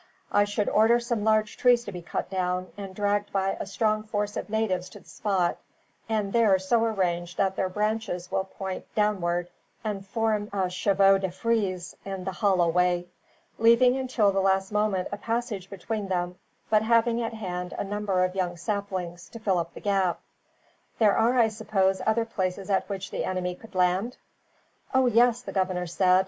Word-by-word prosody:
I 205 Hz, -, +4 dB
should 205 Hz, 0 st, -1 dB
order 225 Hz, +3 st, +4 dB
some 235 Hz, -3 st, -2 dB
large 215 Hz, -1 st, +2 dB
trees 245 Hz, -1 st, +4 dB
to 205 Hz, -, -7 dB
be 180 Hz, -2 st, -7 dB
cut 170 Hz, -, -4 dB
down, 185 Hz, -1 st, -1 dB
and 195 Hz, -2 st, -8 dB
dragged 205 Hz, 0 st, 0 dB
by 195 Hz, 0 st, 0 dB
a -, -, -4 dB
strong 215 Hz, +2 st, +1 dB
force 210 Hz, -1 st, -3 dB
of -, -, -4 dB
natives 195 Hz, -4 st, -1 dB
to -, -, -12 dB
the -, -, -23 dB
spot, 190 Hz, -4 st, 0 dB, 0.5 s
and 210 Hz, -3 st, -1 dB
there 220 Hz, -5 st, +5 dB
so 205 Hz, +5 st, +1 dB
arranged 175 Hz, -6 st, -1 dB
that 190 Hz, -1 st, +1 dB
their 190 Hz, -, 0 dB
branches 210 Hz, -3 st, -2 dB
will 190 Hz, -, 0 dB
point 190 Hz, -1 st, -6 dB
downward 175 Hz, -5 st, 0 dB, 0.3 s
and 205 Hz, -3 st, -3 dB
form 215 Hz, 0 st, -1 dB
a 190 Hz, -2 st, -1 dB
chevaux 195 Hz, 0 st, +4 dB
de 190 Hz, -1 st, -1 dB
frise 185 Hz, -3 st, -1 dB
in 195 Hz, -1 st, -5 dB
the 190 Hz, -, -3 dB
hollow 185 Hz, -2 st, +2 dB
way; 175 Hz, +1 st, +1 dB, 0.5 s
leaving 235 Hz, +2 st, +5 dB
until 255 Hz, -6 st, +2 dB
the 195 Hz, -, 0 dB
last 190 Hz, 0 st, +1 dB
moment 210 Hz, -3 st, +1 dB
a 205 Hz, -, -3 dB
passage 225 Hz, -4 st, -3 dB
between 205 Hz, +2 st, -4 dB
them, 180 Hz, -1 st, -1 dB, 0.4 s
but 215 Hz, -1 st, +5 dB
having 230 Hz, +1 st, +3 dB
at 225 Hz, -1 st, -3 dB
hand 180 Hz, -4 st, -4 dB
a -, -, -1 dB
number 200 Hz, -2 st, 0 dB
of 185 Hz, 0 st, 0 dB
young 180 Hz, -2 st, -2 dB
saplings, 180 Hz, -2 st, -4 dB
to -, -, -9 dB
fill 195 Hz, -5 st, +1 dB
up 170 Hz, 0 st, -5 dB
the -, -, -9 dB
gap. 195 Hz, -4 st, +1 dB, 0.8 s
There 210 Hz, -3 st, +4 dB
are, 235 Hz, +3 st, +3 dB
I 230 Hz, -2 st, +5 dB
suppose, 200 Hz, -3 st, 0 dB
other 225 Hz, +1 st, +2 dB
places 190 Hz, -2 st, -3 dB
at 195 Hz, -, +1 dB
which 195 Hz, -1 st, -5 dB
the -, -, -2 dB
enemy 180 Hz, -1 st, -2 dB
could 220 Hz, +3 st, -15 dB
land?" 185 Hz, +6 st, +1 dB, 0.8 s
"Oh, 260 Hz, 0 st, +5 dB
yes," 240 Hz, 0 st, +4 dB
the -, -, -6 dB
governor 185 Hz, -2 st, 0 dB
said. 180 Hz, +2 st, +3 dB
195 Hz, 185 wpm, -27 LUFS, 185-220 Hz, 0.8 s, there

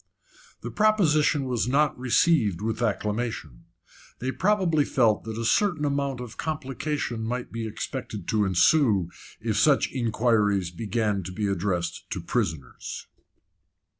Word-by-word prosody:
The -, -, -6 dB
proposition 155 Hz, -9 st, +3 dB
was 125 Hz, -3 st, -1 dB
not 145 Hz, +4 st, +2 dB
received 125 Hz, -, +2 dB
with 110 Hz, +2 st, -3 dB
acclamation. 105 Hz, -, -2 dB, 0.5 s
They 130 Hz, +2 st, -2 dB
probably 185 Hz, -4 st, +2 dB
felt 115 Hz, -7 st, +2 dB
that 110 Hz, -1 st, -5 dB
a 115 Hz, -, -3 dB
certain 165 Hz, -, +2 dB
amount 140 Hz, -2 st, -1 dB
of 120 Hz, -3 st, -8 dB
complication 145 Hz, -5 st, -3 dB
might 125 Hz, +2 st, -4 dB
be 115 Hz, -1 st, -4 dB
expected 110 Hz, -3 st, -6 dB
to 110 Hz, -1 st, +2 dB
ensue 95 Hz, -, +3 dB, 0.3 s
if 110 Hz, -2 st, -2 dB
such 140 Hz, +2 st, +3 dB
inquiries 110 Hz, -6 st, +1 dB
began 105 Hz, +1 st, -1 dB
to 90 Hz, 0 st, -7 dB
be 105 Hz, +3 st, -2 dB
addressed 90 Hz, -3 st, -2 dB
to -, -, -3 dB
prisoners. 70 Hz, -6 st, -3 dB
115 Hz, 130 wpm, -26 LUFS, 105-140 Hz, 0.5 s, proposition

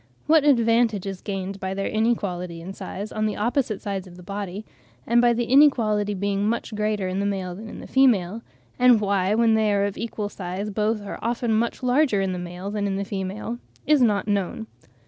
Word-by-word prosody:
What 315 Hz, -1 st, +5 dB
advantage 230 Hz, -6 st, +3 dB
is 195 Hz, -2 st, -5 dB
gained 195 Hz, -1 st, -4 dB
by 190 Hz, 0 st, -3 dB
their 195 Hz, -, -2 dB
inequality 190 Hz, -6 st, -1 dB
in 180 Hz, +3 st, -7 dB
size 200 Hz, +2 st, -6 dB
on 215 Hz, 0 st, 0 dB
the 210 Hz, -, -2 dB
opposite 235 Hz, -1 st, -1 dB
sides 195 Hz, -2 st, -4 dB
of 175 Hz, -1 st, -13 dB
the 180 Hz, -, -12 dB
body, 200 Hz, +1 st, -5 dB, 0.4 s
and 235 Hz, +1 st, +4 dB
by 240 Hz, 0 st, +5 dB
the 235 Hz, +1 st, 0 dB
inequality 230 Hz, -6 st, +3 dB
being 200 Hz, +1 st, 0 dB
much 235 Hz, -1 st, -3 dB
greater 210 Hz, -2 st, -1 dB
in 185 Hz, +1 st, -2 dB
the 200 Hz, -, 0 dB
male 190 Hz, -3 st, -3 dB
than 215 Hz, +5 st, -9 dB
in -, -, -9 dB
the -, -, -9 dB
female; 225 Hz, -6 st, +2 dB, 0.4 s
and 250 Hz, -2 st, +6 dB
why, 200 Hz, -1 st, +1 dB
when 230 Hz, 0 st, +4 dB
they 220 Hz, -1 st, +3 dB
are 200 Hz, 0 st, +2 dB
of 200 Hz, -, -4 dB
equal 220 Hz, -2 st, -3 dB
size, 195 Hz, +2 st, -5 dB
both 215 Hz, +1 st, 0 dB
are 200 Hz, -, -6 dB
often 235 Hz, 0 st, 0 dB
much 230 Hz, +3 st, 0 dB
larger 250 Hz, -3 st, +3 dB
in 195 Hz, -1 st, 0 dB
the 180 Hz, -, -4 dB
male 180 Hz, +3 st, -6 dB
than 205 Hz, -1 st, -1 dB
in 195 Hz, -, -1 dB
the 200 Hz, +1 st, -2 dB
female, 200 Hz, +4 st, -4 dB, 0.3 s
is 295 Hz, -1 st, +4 dB
not 210 Hz, -5 st, +2 dB
known. 205 Hz, +1 st, -1 dB
205 Hz, 210 wpm, -24 LUFS, 195-230 Hz, 0.4 s, and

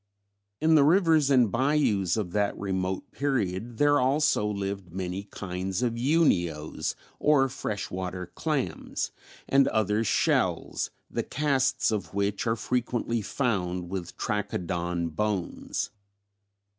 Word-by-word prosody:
In 160 Hz, +1 st, +4 dB
the 150 Hz, -3 st, +7 dB
rivers 160 Hz, -2 st, +4 dB
and 125 Hz, -6 st, +4 dB
bayous 115 Hz, -, +2 dB
of 100 Hz, -5 st, -2 dB
that 100 Hz, +1 st, 0 dB
remote 95 Hz, -1 st, -2 dB
period 115 Hz, -5 st, -1 dB
there 145 Hz, +1 st, +4 dB
also 135 Hz, -4 st, +2 dB
lived 100 Hz, -3 st, -3 dB
many 95 Hz, +2 st, -4 dB
kinds 95 Hz, +2 st, -4 dB
of 120 Hz, -2 st, +1 dB
Unios 115 Hz, -, +1 dB, 0.2 s
or 145 Hz, -3 st, +4 dB
fresh 105 Hz, -5 st, -4 dB
water 90 Hz, -1 st, -4 dB
clams, 135 Hz, -, -2 dB, 0.4 s
and 135 Hz, 0 st, +4 dB
other 110 Hz, 0 st, +1 dB
shells, 110 Hz, -, +1 dB, 0.2 s
the -, -, -1 dB
casts 135 Hz, -4 st, +1 dB
of 95 Hz, -5 st, -3 dB
which 100 Hz, +2 st, 0 dB
are 115 Hz, -, +2 dB
frequently 120 Hz, 0 st, -1 dB
found 90 Hz, -7 st, -1 dB
with 90 Hz, -3 st, -5 dB
Trachodon 85 Hz, -4 st, -2 dB
bones. 100 Hz, +2 st, -2 dB
105 Hz, 120 wpm, -27 LUFS, 95-135 Hz, 0.4 s, the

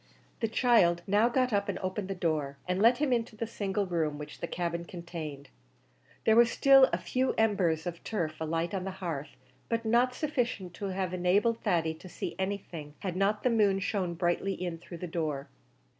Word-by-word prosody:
The 225 Hz, -, +1 dB
child 215 Hz, -7 st, +3 dB
now 210 Hz, +4 st, +3 dB
got 255 Hz, -1 st, +1 dB
up 200 Hz, 0 st, +1 dB
and -, -, -1 dB
opened 190 Hz, +1 st, -3 dB
the 195 Hz, -, -3 dB
door, 155 Hz, -6 st, -1 dB
and 180 Hz, +2 st, 0 dB
let 235 Hz, +3 st, +6 dB
him 285 Hz, -3 st, +1 dB
into 230 Hz, -2 st, -1 dB
the 230 Hz, -, -3 dB
single 200 Hz, -2 st, -2 dB
room 160 Hz, -5 st, -1 dB
which 150 Hz, 0 st, -9 dB
the 170 Hz, -, -3 dB
cabin 170 Hz, -1 st, -2 dB
contained. 165 Hz, -5 st, -7 dB, 0.8 s
There 220 Hz, -, +5 dB
were 235 Hz, +1 st, +8 dB
still 270 Hz, +2 st, +6 dB
a -, -, +1 dB
few 260 Hz, +1 st, 0 dB
embers 185 Hz, -8 st, +2 dB
of 170 Hz, -1 st, -5 dB
turf 165 Hz, -8 st, -2 dB
alight 165 Hz, +3 st, -1 dB
on 190 Hz, -2 st, -2 dB
the 195 Hz, -, -3 dB
hearth, 155 Hz, -6 st, -5 dB, 0.3 s
but 230 Hz, 0 st, -1 dB
not 240 Hz, +3 st, +3 dB
sufficient 245 Hz, -, -2 dB
to 200 Hz, -, -6 dB
have 185 Hz, -1 st, -2 dB
enabled 200 Hz, +6 st, +2 dB
Thady 165 Hz, -6 st, +1 dB
to 170 Hz, +3 st, -12 dB
see -, -, -5 dB
anything 180 Hz, -6 st, -4 dB
had 185 Hz, -3 st, -3 dB
not 200 Hz, +2 st, +1 dB
the 250 Hz, -, +3 dB
moon 205 Hz, -4 st, +3 dB
shone 190 Hz, -3 st, -1 dB
brightly 175 Hz, +3 st, 0 dB
in 175 Hz, -2 st, -4 dB
through 170 Hz, +1 st, -9 dB
the 180 Hz, -, -5 dB
door. 155 Hz, -5 st, -3 dB
190 Hz, 195 wpm, -30 LUFS, 170-220 Hz, 0.8 s, were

